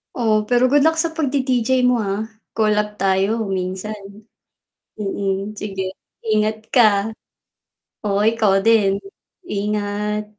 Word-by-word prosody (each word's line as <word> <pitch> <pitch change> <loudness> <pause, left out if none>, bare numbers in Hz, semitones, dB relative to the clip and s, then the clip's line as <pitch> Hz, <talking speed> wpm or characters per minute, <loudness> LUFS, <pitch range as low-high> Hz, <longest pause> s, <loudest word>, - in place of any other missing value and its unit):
o 215 -3 +1
pero 245 0 +3
good 290 -1 +5
luck 320 - +2
sa 325 0 0
pagdi-DJ 260 -5 +1
mo 250 -1 +3
ha, 205 0 -2 0.3
call 215 -1 +2
up 210 0 -3
tayo 195 +3 +1
minsan. 190 +3 -3 1.0
Mm, 200 +1 -2
sige 195 -2 -4 0.5
ingat 215 +1 0
ka. 245 -4 +6 1.2
Oo, 205 0 +1
ikaw 220 -3 +3
din, 210 -4 +4 0.5
ingat. 210 - -3
210 Hz, 115 wpm, -20 LUFS, 200-230 Hz, 1.2 s, ka